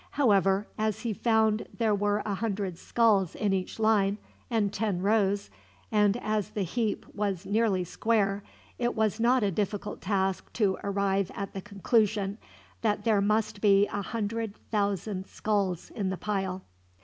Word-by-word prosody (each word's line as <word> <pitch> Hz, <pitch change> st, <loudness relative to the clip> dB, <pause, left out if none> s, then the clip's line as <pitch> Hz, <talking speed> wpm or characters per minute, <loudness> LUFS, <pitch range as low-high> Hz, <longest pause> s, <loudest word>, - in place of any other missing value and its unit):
However, 200 Hz, -6 st, +3 dB
as 215 Hz, 0 st, 0 dB
he 230 Hz, -2 st, -1 dB
found 220 Hz, 0 st, +2 dB
there 225 Hz, -3 st, +2 dB
were 205 Hz, +1 st, +1 dB
a 210 Hz, -, -1 dB
hundred 195 Hz, -4 st, -2 dB
skulls 210 Hz, -7 st, +2 dB
in 205 Hz, -2 st, 0 dB
each 185 Hz, -1 st, -2 dB
line, 210 Hz, -2 st, +3 dB, 0.3 s
and 215 Hz, -4 st, +1 dB
ten 205 Hz, -5 st, -1 dB
rows, 200 Hz, -, +1 dB, 0.4 s
and 210 Hz, 0 st, +3 dB
as 215 Hz, -3 st, -1 dB
the 210 Hz, -2 st, -2 dB
heap 220 Hz, +4 st, -1 dB
was 200 Hz, -3 st, -2 dB
nearly 200 Hz, -2 st, +2 dB
square, 200 Hz, +1 st, 0 dB, 0.4 s
it 240 Hz, 0 st, 0 dB
was 220 Hz, 0 st, +1 dB
not 240 Hz, +1 st, +3 dB
a 200 Hz, -, +2 dB
difficult 205 Hz, +2 st, -3 dB
task 190 Hz, -1 st, -1 dB
to 200 Hz, -4 st, +1 dB
arrive 200 Hz, -1 st, 0 dB
at 200 Hz, -1 st, -5 dB
the 195 Hz, -, -5 dB
conclusion 205 Hz, 0 st, 0 dB, 0.4 s
that 210 Hz, -2 st, 0 dB
there 215 Hz, -3 st, +3 dB
must 215 Hz, 0 st, 0 dB
be 200 Hz, -1 st, +5 dB
a 205 Hz, -, -2 dB
hundred 225 Hz, 0 st, -3 dB, 0.2 s
thousand 200 Hz, -2 st, -1 dB
skulls 200 Hz, -5 st, -1 dB
in 200 Hz, -3 st, -2 dB
the 190 Hz, -, -3 dB
pile. 190 Hz, -2 st, -2 dB
205 Hz, 155 wpm, -28 LUFS, 195-220 Hz, 0.4 s, be